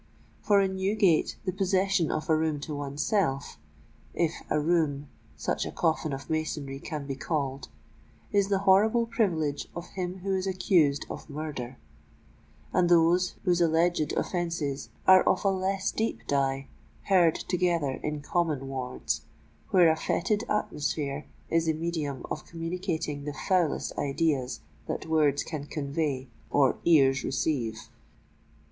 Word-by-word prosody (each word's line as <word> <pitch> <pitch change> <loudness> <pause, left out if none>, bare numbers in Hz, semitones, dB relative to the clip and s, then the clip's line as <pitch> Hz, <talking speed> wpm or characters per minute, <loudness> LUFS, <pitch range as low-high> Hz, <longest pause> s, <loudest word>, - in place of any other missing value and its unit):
For 205 -1 +4
in 190 -1 -1
Newgate 190 -3 +2
the 185 - 0
possession 190 -2 +1
of 155 - -2
a 160 - +4
room 155 -1 0
to 150 0 -5
oneself—if 140 - -2 0.2
a 150 - +2
room 150 -3 +1 0.3
such - - -1
a - - -4
coffin 160 -2 0
of 135 0 -5
masonry 150 -3 -3
can 150 -1 -5
be 140 - -3
called—is 140 +7 -3
the 200 -1 +2
horrible 220 +5 +5
privilege 175 - 0
of 170 +1 -6
him 180 0 -4
who 195 -1 0
is 190 0 -1
accused 180 -7 +2
of - - -8
murder; 140 -4 -5 1.0
and 175 -1 +3
those 175 +1 +4
whose 175 -3 +2
alleged 165 -1 +2
offences 165 -6 -2 0.2
are 185 0 +8
of - - +2
a - - +5
less 190 +1 -1
deep 225 +1 -2
dye, 135 -1 0 0.4
herd 175 -5 +4
together 170 -7 0
in 150 -1 -3
common 150 -4 -1
wards, 125 - -3 0.5
where 180 -3 +6
a - - +1
fetid 205 +6 0
atmosphere 150 -7 -2 0.2
is 165 0 +2
the 160 - +3
medium 155 -5 -3
of 155 - -5
communicating 165 -3 -3
the 150 -1 -4
foulest 180 -5 +1
ideas 140 -3 0 0.3
that - - -3
words 150 -3 +2
can 145 -3 -6
convey 140 -3 -2 0.2
or 140 -2 +3
ears 140 -5 +5
receive. 125 -5 -1
160 Hz, 135 wpm, -28 LUFS, 140-180 Hz, 1.0 s, are